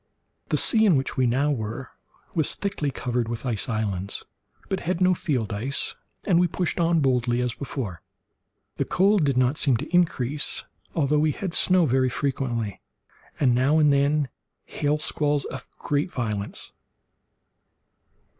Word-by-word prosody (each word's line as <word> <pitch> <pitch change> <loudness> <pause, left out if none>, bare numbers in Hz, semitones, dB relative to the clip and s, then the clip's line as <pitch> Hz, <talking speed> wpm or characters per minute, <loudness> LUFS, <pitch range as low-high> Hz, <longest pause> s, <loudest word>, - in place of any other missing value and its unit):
The - - +2
sea 220 -1 +3
in 180 - +5
which 135 -1 -1
we 130 -1 +2
now 135 +5 +2
were 115 0 -4 0.4
was 160 -3 0
thickly 195 -8 -2
covered 125 -3 -2
with 120 +2 -4
ice 120 -1 -2
islands, 100 -4 -2 0.4
but 190 - -1
had 180 0 -2
no 185 0 +4
field 130 - -1
ice, 125 +7 -2 0.3
and 175 -4 +3
we 180 - +4
pushed 175 +1 -2
on 165 -1 +3
boldly 125 -3 +2
as 125 -1 0
before. 120 - -5 0.8
The - - 0
cold 195 0 +3
did 140 -3 +1
not 130 +3 +2
seem 135 -6 +3
to 150 +8 -3
increase, 150 -5 +1 0.3
although 150 -1 +2
we 155 0 +2
had 185 +1 -4
snow 185 -2 +4
very 130 -1 +2
frequently, 120 -5 -2 0.6
and 130 -4 +4
now 130 +5 +3
and 150 -2 +5
then 140 0 +2 0.4
hail 145 +1 0
squalls 150 -2 +1
of 130 -1 -7
great 145 +5 -1
violence. 105 -4 -3
140 Hz, 155 wpm, -25 LUFS, 120-155 Hz, 0.8 s, in